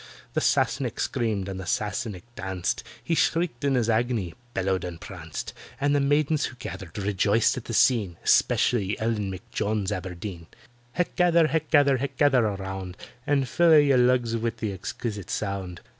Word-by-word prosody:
The - - 0
Sassenach - - +1
screamed, 105 -5 -1
and 95 -1 -5
the 95 - -7
Sassenach 105 -4 -2
danced; 95 -5 -2 0.2
He 170 - -1
shrieked 165 -5 +1
in 140 -1 +2
his 120 -3 +1
agony—bellowed 110 -4 -1
and 85 -2 -6
pranced; 80 -4 -7 0.3
And 145 0 +2
the - - +3
maidens 145 +2 +2
who 125 - -6
gathered 95 -7 -8
rejoiced 100 +2 +2
at 125 - -6
the 115 - -5
scene— 105 -10 +3
Especially 105 -5 +2
ELLEN 110 -3 -1
M'JONES 100 +2 -2
ABERDEEN. 90 -2 -6 0.5
"Hech 180 - -1
gather, 170 -2 +4
hech 160 -2 -1
gather, 140 -3 +5
hech 140 +2 -4
gather 135 -5 +4
around; 95 -2 -5 0.3
And 140 -2 +2
fill 170 +5 +4
a' 155 - +9
ye 140 -2 +4
lugs 125 -2 +3
wi' 115 +1 0
the 110 -2 -3
exquisite 105 0 -5
sound. 95 -4 -3
110 Hz, 160 wpm, -26 LUFS, 95-135 Hz, 0.5 s, a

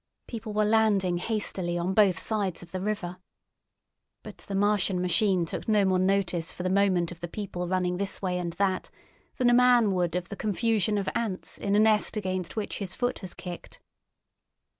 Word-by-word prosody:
People 225 -2 -6
were 210 0 +1
landing 210 -5 +2
hastily 185 -4 -2
on 175 +2 -1
both 200 -3 +4
sides 200 -6 -2
of 170 - -14
the 185 - -4
river. 190 -3 -3 1.1
But - - -10
the 195 - -6
Martian 200 -2 +2
machine 180 0 +2
took - - -5
no 210 -2 +3
more 185 -1 +2
notice 185 -3 0
for 180 - -7
the 185 - 0
moment 185 -3 +2
of 175 - -10
the 175 - -5
people 180 -1 -5
running 180 -1 0
this 200 +1 -2
way 180 -2 -1
and 170 -1 -3
that 190 0 -1 0.5
than 250 - +2
a - - +4
man 245 -3 +5
would 175 -3 0
of 180 -1 -3
the - - -5
confusion 215 0 0
of 200 - -2
ants 215 -5 -3
in 200 0 0
a - - +5
nest 215 0 +3
against 185 -3 -3
which 215 -2 -3
his 195 -3 -4
foot 245 0 -1
has 185 -3 -6
kicked. 175 -1 -9
195 Hz, 190 wpm, -27 LUFS, 180-210 Hz, 1.1 s, man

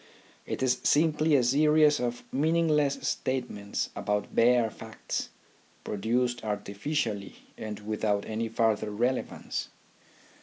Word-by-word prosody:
It - - -3
is 125 -1 +2
simply 155 0 +3
a 130 - +4
series 150 +3 +4
of 120 0 -2
meaningless 150 -1 +2
statements 125 -6 -2
about 105 0 -2
bare 120 -1 +4
facts, 110 -1 -5 0.5
produced 120 +4 -1
artificially 105 +1 -3 0.2
and 105 -1 -6
without 105 -1 -1
any 110 +1 -3
further 110 -1 +1
relevance. 120 +5 -2
120 Hz, 105 wpm, -28 LUFS, 105-145 Hz, 0.5 s, a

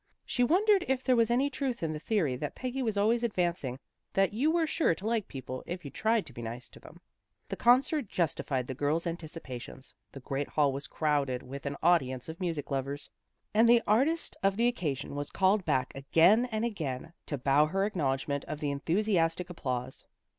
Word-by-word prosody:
She 245 - 0
wondered 385 - +4
if 260 -1 0
there 255 -2 +3
was 230 -1 +3
any 265 +4 +2
truth 260 - -3
in 160 -1 -1
the 155 - -5
theory 165 - 0
that 145 +2 -4
Peggy 255 +1 -3
was 220 -5 -1
always 225 +4 +3
advancing, 175 - -1 0.4
that 195 +1 +2
you 265 +8 +2
were 330 0 +2
sure 310 - +1
to 190 - -9
like 225 -2 0
people 130 -1 -7
if 175 -2 -5
you 140 - -6
tried 220 -1 +1
to - - -12
be 120 - -8
nice 120 +2 -6
to - - -15
them. - - -15 0.5
The - - -2
concert 260 +3 +3
justified 150 -7 -1
the 130 - -5
girls' 145 +5 0
anticipations. 155 -7 -7 0.2
The 135 - -9
great 135 +2 -3
hall 145 -3 +2
was 140 +1 -5
crowded 145 -5 0
with 140 +2 -7
an 140 0 -3
audience 130 -7 +2
of 160 +3 -8
music 165 -5 -3
lovers, 140 +1 -3 0.4
and 225 +2 +5
the 235 -1 +6
artist 275 +11 +2
of 195 0 +2
the 235 - +3
occasion 155 - -2
was 145 0 -4
called 190 0 +2
back 130 0 0
again 165 - +4
and 220 -1 -1
again, 160 - -4
to 145 - -2
bow 140 +3 +3
her 195 +5 0
acknowledgement 140 -7 -1
of 150 - -5
the 145 -2 -1
enthusiastic 170 +2 0
applause. 130 -5 -4
170 Hz, 195 wpm, -30 LUFS, 140-225 Hz, 0.5 s, the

